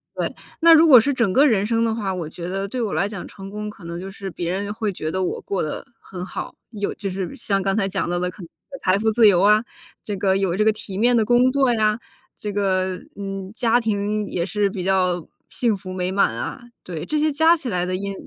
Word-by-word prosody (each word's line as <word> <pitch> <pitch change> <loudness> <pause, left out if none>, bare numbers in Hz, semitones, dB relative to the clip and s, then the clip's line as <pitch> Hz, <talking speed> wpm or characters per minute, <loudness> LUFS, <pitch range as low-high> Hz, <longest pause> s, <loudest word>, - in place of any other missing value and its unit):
对， - - -2 0.2
那 330 0 +7
如 325 +1 +7
果 255 -6 +10
是 280 +5 +1
整 230 -7 +1
个 280 - +6
人 210 -6 +2
生 230 +1 +1
的 225 -1 +1
话， 200 -4 -2
我 175 -4 -4
觉 170 +1 -7
得 195 +2 -3
对 250 +4 -4
我 210 -7 -2
来 180 +6 +1
讲 200 -4 -7
成 195 0 -10
功 210 +1 -5
可 200 -4 -13
能 170 +1 -5
就 195 +1 -7
是 195 0 -7
别 170 -1 -4
人 200 +2 -2
会 215 -1 -2
觉 155 -2 -4
得 190 0 -1
我 180 - -2
过 195 - -2
得 155 - -4
很 180 -2 -8
好， - - -6 0.2
有 205 -2 -3
就 195 - -5
是 185 -1 -4
像 195 -1 -1
刚 195 0 0
才 200 -3 +1
讲 190 -2 -2
到 175 - 0
的 180 0 0
可 185 - -12
能 - - -9
是 275 - -14
财 185 +1 +3
富 220 0 +2
自 225 -1 +6
由 180 -3 +5
啊， 210 +2 +5 0.4
这 205 - -4
个 190 0 +2
有 190 -3 0
这 215 - +2
个 220 - +5
体 200 -2 -6
面 240 +3 +4
的 220 - +3
工 245 +3 +4
作 265 -2 +3
呀， 215 0 +1 0.4
这 210 - -4
个， 190 -2 0 0.2
嗯， 195 -1 -6
家 235 0 +3
庭 210 -1 -1
也 170 -1 -2
是 200 +2 0
比 190 -2 -5
较 180 -3 +1 0.2
幸 235 -4 +1
福 190 -1 -8
美 185 0 -2
满 200 - +2
啊， - - -5 0.2
对， 165 -4 -6
这 305 - -1
些 305 0 +2
加 320 +4 +4
起 285 -5 -6
来 180 -4 0
的 185 0 -2
因 200 +1 -3
200 Hz, 275 characters per minute, -22 LUFS, 185-225 Hz, 0.4 s, 果